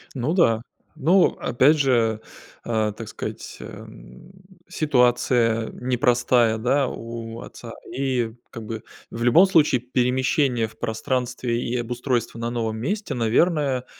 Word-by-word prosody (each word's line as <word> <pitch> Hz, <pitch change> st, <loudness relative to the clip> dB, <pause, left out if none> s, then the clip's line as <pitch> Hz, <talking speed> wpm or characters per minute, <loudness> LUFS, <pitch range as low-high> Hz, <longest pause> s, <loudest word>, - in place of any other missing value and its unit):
Ну 130 Hz, +5 st, -1 dB
да, 115 Hz, -, +3 dB, 0.3 s
ну 170 Hz, +5 st, +4 dB
опять 135 Hz, +6 st, +3 dB
же, 115 Hz, -6 st, +2 dB, 0.4 s
а, 110 Hz, -2 st, 0 dB
так 110 Hz, +2 st, -9 dB
сказать, -, -, -7 dB
эм, -, -, -12 dB, 0.4 s
ситуация 120 Hz, -5 st, +2 dB
непростая, 120 Hz, -2 st, +2 dB
да, 130 Hz, +4 st, +1 dB
у 115 Hz, 0 st, -7 dB
отца. 115 Hz, -1 st, -10 dB, 0.2 s
И 130 Hz, -4 st, -1 dB, 0.2 s
как 115 Hz, -, -8 dB
бы 110 Hz, 0 st, -6 dB, 0.3 s
в 115 Hz, -, -4 dB
любом 140 Hz, +10 st, +6 dB
случае 150 Hz, -9 st, +3 dB
перемещение 125 Hz, 0 st, +1 dB
в 110 Hz, -, -18 dB
пространстве 120 Hz, +1 st, -2 dB
и 120 Hz, 0 st, -2 dB
обустройство 120 Hz, -1 st, -2 dB
на 115 Hz, 0 st, -2 dB
новом 115 Hz, -2 st, -2 dB
месте, 200 Hz, -, -3 dB
наверное, 130 Hz, +2 st, +1 dB
120 Hz, 125 wpm, -23 LUFS, 115-130 Hz, 0.4 s, любом